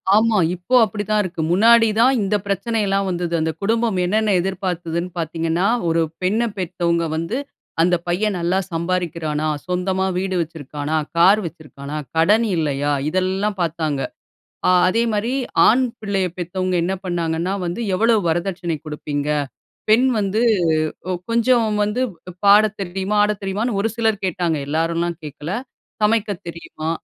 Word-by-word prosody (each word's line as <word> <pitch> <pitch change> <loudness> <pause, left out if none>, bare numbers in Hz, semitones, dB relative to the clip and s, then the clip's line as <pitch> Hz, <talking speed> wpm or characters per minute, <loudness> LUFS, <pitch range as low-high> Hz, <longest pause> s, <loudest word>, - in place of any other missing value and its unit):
ஆமா 220 0 +3 0.2
இப்போ 180 +8 -1
அப்டித்தான் 210 +1 -1
இருக்கு. 175 -3 -4
முன்னாடி 225 +5 +6
தான் 255 +3 +5
இந்த 200 +1 0
பிரச்சனைலாம் 200 -1 0
வந்தது. 175 -1 -2
அந்த 160 0 0
குடும்பம் 225 0 +1
என்னென்ன 215 +3 +1
எதிர்பார்த்ததுன்னு 180 -2 -3
பாத்தீங்கனா, 165 +3 0 0.2
ஒரு 165 0 +2 0.2
பெண்ணப் 215 +4 0
பெத்தவங்க 170 -2 0
வந்து, 165 +9 -2 0.4
"அந்த 175 +1 +4
பையன் 195 +4 0
நல்லா 175 +3 +1
சம்பாரிக்கிறானா? 165 -3 -2 0.2
சொந்தமா 185 +1 0
வீடு 190 0 -1
வச்சிருக்குறானா? 150 -1 -4 0.2
கார் 190 +5 +6
வச்சிருக்குறானா? 150 -3 -8 0.2
கடன் 210 +8 +4
இல்லையா?" 145 -2 0 0.2
இதெல்லாம் 190 +4 -1
பாத்தாங்க. 160 -4 -1 0.7
ஆ - - +5 0.2
அதே 225 +5 +2
மாரிஆண் 245 +2 +2 0.2
பிள்ளைய 195 -3 -1
பெத்தவங்க 185 +1 -2
என்ன 185 +3 0
பண்ணாங்கன்னா 170 0 -1
வந்து, 175 +7 -3
"எவ்வளவு 225 +2 +3
வரதட்சணை 175 0 -1
குடுப்பீங்க?" 150 -1 -3 0.6
"பெண் 235 +5 +5
வந்து 205 +2 0 0.9
கொஞ்சம் 235 0 +3 0.2
வந்து 210 +5 -1 0.4
பாடத் 210 +1 +5
தெரியுமா? 195 +2 -2
ஆட 210 - +1
தெரியுமா"ன்னு 200 +3 -1
ஒரு 225 - 0
சிலர் 220 -3 0
கேட்டாங்க, 175 -3 -1
எல்லாரும்லாம் 165 +2 -1
கேட்கல. 150 +2 -7 0.5
"சமைக்க 215 0 +2 0.2
தெரியுமா?" 165 -1 -6
185 Hz, 125 wpm, -20 LUFS, 165-210 Hz, 0.9 s, முன்னாடி